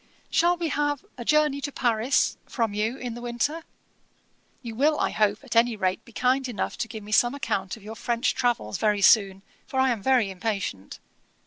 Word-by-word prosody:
'Shall 350 Hz, +1 st, +3 dB
we 335 Hz, -2 st, -2 dB
have 290 Hz, -1 st, -1 dB
A -, -, -4 dB
Journey 300 Hz, +1 st, +2 dB
to 285 Hz, -, -3 dB
Paris 240 Hz, +1 st, +1 dB
from 230 Hz, -4 st, -1 dB
you 220 Hz, +5 st, -1 dB
in 245 Hz, -3 st, -5 dB
the 240 Hz, -, -8 dB
winter? 245 Hz, +7 st, -2 dB, 1.0 s
You 230 Hz, -2 st, -6 dB
will, 295 Hz, +6 st, +2 dB
I -, -, +1 dB
hope, 210 Hz, +2 st, +1 dB
at 255 Hz, -3 st, -6 dB
any 230 Hz, 0 st, +4 dB
rate 185 Hz, -3 st, -1 dB
be 235 Hz, -, -15 dB
kind 255 Hz, +3 st, +1 dB
enough 215 Hz, -5 st, -3 dB
to -, -, -1 dB
give 220 Hz, -2 st, -8 dB
me 210 Hz, -, -10 dB
some 240 Hz, +5 st, +3 dB
account 195 Hz, -8 st, -2 dB
of 215 Hz, -, -17 dB
your 220 Hz, +2 st, -8 dB
French 235 Hz, +2 st, 0 dB
travels 235 Hz, -, -1 dB
very 210 Hz, -2 st, +1 dB
soon, 195 Hz, -3 st, +4 dB, 0.2 s
for 265 Hz, -4 st, -2 dB
I 260 Hz, 0 st, +4 dB
am 225 Hz, -4 st, -2 dB
very 245 Hz, -4 st, +2 dB
impatient. 190 Hz, -, -4 dB
235 Hz, 200 wpm, -25 LUFS, 210-265 Hz, 1.0 s, any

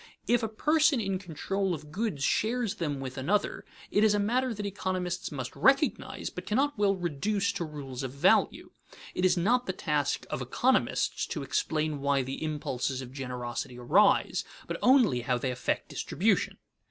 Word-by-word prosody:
If 240 Hz, 0 st, +3 dB
a 225 Hz, -, 0 dB
person 300 Hz, +5 st, +3 dB
in 195 Hz, -3 st, -1 dB
control 190 Hz, +1 st, -2 dB
of 150 Hz, -1 st, -11 dB
goods 190 Hz, -6 st, -2 dB
shares 225 Hz, -, +1 dB
them 145 Hz, -4 st, -1 dB
with 130 Hz, 0 st, -5 dB
another, 200 Hz, +10 st, 0 dB, 0.3 s
it 205 Hz, -, +3 dB
is 215 Hz, -1 st, +5 dB
a -, -, +1 dB
matter 245 Hz, +5 st, +1 dB
that 210 Hz, -2 st, -4 dB
economists 185 Hz, -3 st, -3 dB
must 130 Hz, -4 st, -5 dB
recognize, 275 Hz, +2 st, +2 dB
but -, -, -8 dB
cannot 280 Hz, +7 st, +1 dB
well 205 Hz, -1 st, +2 dB
reduce 190 Hz, +4 st, -1 dB
to -, -, -3 dB
rules 140 Hz, -4 st, -7 dB
of 130 Hz, -2 st, -4 dB
value. 140 Hz, +1 st, +2 dB, 0.4 s
It 180 Hz, -, 0 dB
is 185 Hz, -, +4 dB
not 240 Hz, +8 st, +2 dB
the 185 Hz, -, -1 dB
task 150 Hz, -5 st, -1 dB
of -, -, -2 dB
economists -, -, +1 dB
to -, -, -4 dB
explain 150 Hz, +2 st, -1 dB
why 140 Hz, -1 st, +2 dB
the 135 Hz, +4 st, -5 dB
impulses 135 Hz, -4 st, -2 dB
of 125 Hz, 0 st, -11 dB
generosity 125 Hz, -1 st, -5 dB
arise, 125 Hz, +12 st, +3 dB, 0.2 s
but -, -, -4 dB
only 245 Hz, -, +5 dB
how 125 Hz, +1 st, 0 dB
they 130 Hz, +1 st, -2 dB
affect 125 Hz, -, -2 dB
distribution. -, -, 0 dB
175 Hz, 170 wpm, -29 LUFS, 135-210 Hz, 0.4 s, is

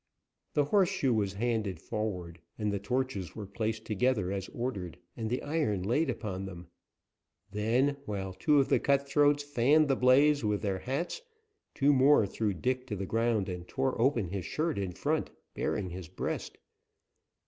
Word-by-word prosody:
The 145 Hz, -, +4 dB
horseshoe 190 Hz, -, +2 dB
was 100 Hz, -3 st, 0 dB
handed 105 Hz, -4 st, -1 dB
forward, 90 Hz, -6 st, -4 dB, 0.2 s
and 105 Hz, -2 st, -1 dB
the 100 Hz, -, -1 dB
torches 115 Hz, -5 st, -2 dB
were 105 Hz, -, -5 dB
placed 110 Hz, +2 st, -3 dB
together 110 Hz, -3 st, +1 dB
as 95 Hz, -1 st, -3 dB
ordered, 100 Hz, -9 st, -4 dB, 0.2 s
and 110 Hz, -2 st, -3 dB
the 125 Hz, +3 st, -2 dB
iron 145 Hz, -, 0 dB
laid 135 Hz, -, +1 dB
upon 105 Hz, -5 st, -3 dB
them. 85 Hz, -3 st, -9 dB, 0.8 s
Then, 120 Hz, +7 st, +1 dB
while 95 Hz, -2 st, -4 dB
two 145 Hz, +11 st, +2 dB
of 135 Hz, -, +2 dB
the -, -, +4 dB
cutthroats 145 Hz, +1 st, +3 dB
fanned 145 Hz, +2 st, +3 dB
the 135 Hz, -, +4 dB
blaze 140 Hz, +3 st, +4 dB
with 105 Hz, -1 st, 0 dB
their 95 Hz, -2 st, -1 dB
hats, 140 Hz, -, -3 dB, 0.5 s
two 145 Hz, +1 st, +4 dB
more 135 Hz, -3 st, +5 dB
threw 105 Hz, +1 st, -1 dB
Dick 130 Hz, +6 st, -1 dB
to 105 Hz, -, -3 dB
the 95 Hz, 0 st, -3 dB
ground 115 Hz, -1 st, +1 dB
and 90 Hz, -1 st, -6 dB
tore 130 Hz, -3 st, -1 dB
open 120 Hz, -8 st, +2 dB
his 95 Hz, 0 st, -3 dB
shirt 155 Hz, -1 st, -1 dB
in 95 Hz, -2 st, -2 dB
front, -, -, -1 dB, 0.2 s
baring 95 Hz, -4 st, -2 dB
his 90 Hz, -1 st, -7 dB
breast. -, -, -4 dB
115 Hz, 165 wpm, -30 LUFS, 100-135 Hz, 0.8 s, more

